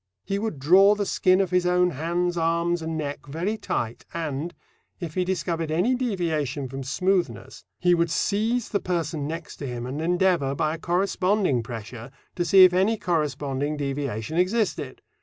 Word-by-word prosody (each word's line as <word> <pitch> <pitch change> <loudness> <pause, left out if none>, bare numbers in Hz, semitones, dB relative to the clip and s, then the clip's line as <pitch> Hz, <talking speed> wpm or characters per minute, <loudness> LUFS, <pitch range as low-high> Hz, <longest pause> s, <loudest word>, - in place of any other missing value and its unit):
He 200 0 -1
would 215 -7 -3
draw 190 +9 +6
the 205 -1 -1
skin 185 -1 +3
of 185 -2 -1
his 180 -1 +2
own 180 0 +3
hands 170 +4 -1
arms, 170 +1 +1
and 160 0 -3
neck, 145 -1 -5
very 170 +9 -2
tight, 120 - -3
and, 160 0 -3 0.5
if 170 -4 -5
he 185 - +1
discovered 170 -3 -2
any 180 +11 +2
deviation 160 - -1
from 135 +2 -6
smoothness, 180 +7 -1
he 180 -1 +3
would 170 -1 +2
seize 220 +7 0
the 200 - 0
person 165 -5 -2
next 165 +1 -6
to 140 - -5
him 120 -1 -5
and 135 +4 -4
endeavour, 175 -5 +1
by 155 +2 0
a 165 - -6
corresponding 185 - +1
pressure, 115 +1 -8 0.3
to 175 - 0
see 190 +2 +7
if 185 -1 +7
any 195 +5 +2
corresponding 150 -4 -1
deviation 140 -1 -3
existed. 205 +4 -1
170 Hz, 170 wpm, -25 LUFS, 145-185 Hz, 0.5 s, see